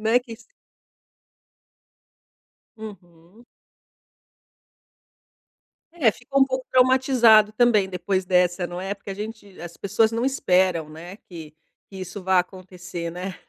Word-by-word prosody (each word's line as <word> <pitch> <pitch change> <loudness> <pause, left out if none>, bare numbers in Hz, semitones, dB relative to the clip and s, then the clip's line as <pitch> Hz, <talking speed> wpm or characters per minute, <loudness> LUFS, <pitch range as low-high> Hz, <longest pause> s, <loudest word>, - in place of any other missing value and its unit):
Né, 225 +3 +3
que 240 -2 -11
se 230 - -18 2.4
Uhum. 190 0 -13 2.5
É, 245 -10 +3
ficou 275 +5 -2
um - - +6
pouco 260 -1 -4
traumatizado 255 -4 +4
também 215 -4 +3
depois 185 +1 -2
dessa, 180 0 +1
não 175 +1 -7
é? 195 +1 -3
Porque 195 0 -9
a - - -4
gente 210 -1 -9
as 170 -1 -10
pessoas 220 +3 +1
não 230 +2 -2
esperam, 185 - +1
né, 170 +5 -11
que 160 -7 -12 0.4
que 195 - -11
isso 185 +1 -8
vá 190 0 +3
acontecer, 180 -2 -7
né? 180 +1 -6
195 Hz, 125 wpm, -23 LUFS, 180-225 Hz, 2.5 s, um